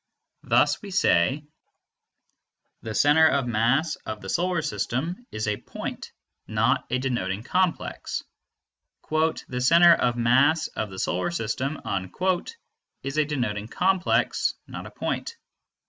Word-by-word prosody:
Thus - - +2
we 205 - -8
say: 140 - +2 1.4
The 110 -1 -6
center 150 +6 +5
of 140 -4 +1
mass 120 +8 +1
of 110 -1 -7
the 95 - -8
Solar 175 - 0
System 150 - -3
is 110 0 -3
a 105 -1 0
point, - - -7 0.4
not 110 +3 +1
a 125 - +1
denoting 110 -6 -2
complex; 180 +4 -1 0.9
"The 155 -5 0
center 170 +6 +7
of 120 -6 +1
mass 135 +7 +3
of 110 - -4
the 95 - -10
Solar 90 - -1
System" 135 0 -2 1.2
is 140 +2 -4
a 155 - +3
denoting 115 -8 -2
complex, 185 +7 +1
not - - -8
a - - -9
point. 465 - -4
135 Hz, 125 wpm, -25 LUFS, 110-160 Hz, 1.4 s, center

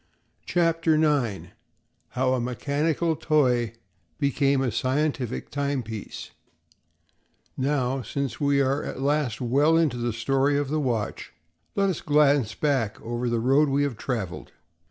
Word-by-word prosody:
CHAPTER 165 -2 +2
NINE 145 -10 0 0.7
How 130 0 +2
a 130 - +1
Mechanical 145 +6 0
Toy 125 -8 +1 0.5
Became 140 0 +2
a 125 - 0
Scientific 130 -1 -1
Timepiece 130 -7 -4 1.2
Now, 135 -1 0
since 140 0 -4
we 140 -1 +3
are 135 +2 +1
at - - -6
last 140 -4 0
well 145 +7 +3
into 155 -7 +2
the 120 0 -1
story 135 +5 +1
of 145 -2 -1
the 155 +1 0
watch, 120 -7 -2 0.4
let 200 0 +2
us 185 -5 -2
glance 145 -7 +3
back 130 -8 0
over 120 +1 -3
the 120 -1 0
road 135 +5 +3
we 140 +1 +2
have 140 -4 -1
traveled. 110 -6 -4
135 Hz, 135 wpm, -25 LUFS, 125-150 Hz, 1.2 s, we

